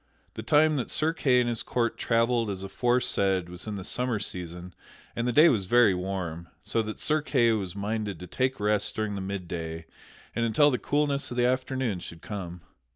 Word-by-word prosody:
The - - -6
time 150 +5 +3
that 125 - -3
Sir 160 +1 +1
Kay 130 -6 +3
and 120 - 0
his 120 -1 0
court 115 -2 -1
travelled 115 -1 +1
as 95 -1 -4
aforesaid 95 -4 +1
was 90 +4 -6
in 105 - -3
the 95 - -6
summer 125 +3 -1
season 90 -2 -6 0.4
and 120 +1 -1
the - - +2
day 155 +7 +7
was 110 - +2
very 120 0 +5
warm, 90 -3 -4 0.2
so 115 - 0
that 110 -1 -5
Sir 155 0 +1
Kay 120 -5 +2
was 100 -5 -2
minded 105 -2 -3
to 90 - -8
take 130 +8 -1
rest 105 0 +1
during 110 -1 -2
the 100 - -4
midday 85 -4 -5 0.5
and 115 - 0
until 130 +6 +4
the 125 - -1
coolness 145 -1 0
of 120 - -6
the 120 - +3
afternoon 130 -4 -1
should 85 -1 -10
come. 90 -4 -6
110 Hz, 200 wpm, -27 LUFS, 95-125 Hz, 0.5 s, day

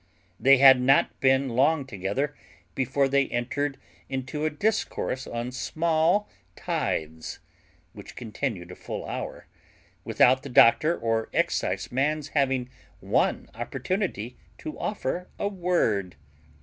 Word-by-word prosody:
They 135 +4 +6
had 130 -1 +8
not 135 +2 +3
been 135 0 +3
long 140 +4 +2
together 130 +6 -3 0.4
before 135 +1 +1
they 140 0 +2
entered 135 +4 -2 0.3
into 135 +3 -3
a - - +2
discourse 155 -6 -2
on 120 +1 -4
small 160 +9 +1 0.3
tithes, 80 0 -3 0.6
which - - -11
continued 110 -6 -4
a - - -9
full - - -6
hour, - - -6 0.6
without 130 +1 +4
the 140 - -8
doctor 125 +7 +5
or 115 -1 -1
exciseman's 150 +3 0
having 135 -4 +1 0.3
one - - 0
opportunity 125 - -3 0.2
to 155 - -7
offer 180 -2 -3
a 200 - -1
word. 175 - 0
135 Hz, 115 wpm, -26 LUFS, 120-155 Hz, 0.6 s, had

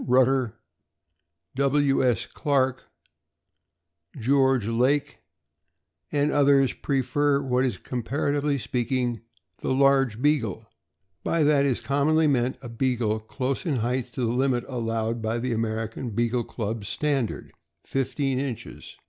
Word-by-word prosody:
Rutter, 130 -2 +2 1.0
W. 140 +1 +2
S. 120 -6 +1
Clark, 130 -4 0 1.3
George 130 -1 +3
Laick, 125 +6 +1 0.9
and 145 0 +1
others, 140 -2 +4
prefer 140 +1 +1
what 130 -2 +1
is 125 -7 -1
com 125 +5 -4
paratively 145 +2 0
speaking 120 -1 -1 0.4
the - - -2
large 135 -4 +3
Beagle; 115 -7 0 0.6
by 165 -2 +1
that 145 -1 +4
is 130 - 0
com 140 +2 0
monly 155 0 +4
meant 130 -3 +1
a - - -6
Beagle 115 -2 0
close 130 +6 -3
in 160 -7 0
height 125 +2 -1
to - - -4
the 115 -1 +1
limit 125 -1 +1
allowed 115 -2 -2
by 110 +1 -1
the 125 +1 -2
American 115 +2 -3
Beagle 120 +2 0
Club's 110 -2 -4
standard 140 -6 -2 0.2
— - - -53
fifteen 135 0 -1
inches. 125 -4 -6
130 Hz, 130 wpm, -25 LUFS, 115-140 Hz, 1.3 s, others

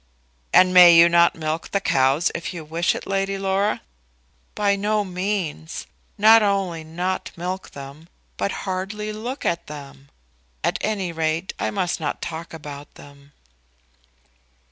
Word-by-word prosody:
"And 185 0 +5
may 175 -2 +9
you 170 +1 +8
not 170 0 +4
milk 155 +1 -3
the 200 - 0
cows 135 -1 +2
if 170 +2 -5
you 160 -2 -7
wish 165 +3 0
it, - - -6
Lady 195 0 -1
Laura?" 195 +2 0 0.7
"By 205 -1 +2
no 210 +1 0
means; 180 -4 -3 0.3
not 220 +2 +7
only 195 -5 0
not 180 +4 -3
milk 180 +2 -4
them, 140 +4 -11 0.3
but 200 - -1
hardly 200 +3 -3
look 240 +6 -6
at 170 0 -1
them. 140 -2 -11 0.5
At - - 0
any 200 -5 -1
rate, 165 +2 -2
I - - 0
must 185 -4 -1
not 150 -3 -3
talk 165 +1 -6
about 145 -2 -9
them." 140 0 -16
175 Hz, 145 wpm, -22 LUFS, 160-195 Hz, 0.7 s, may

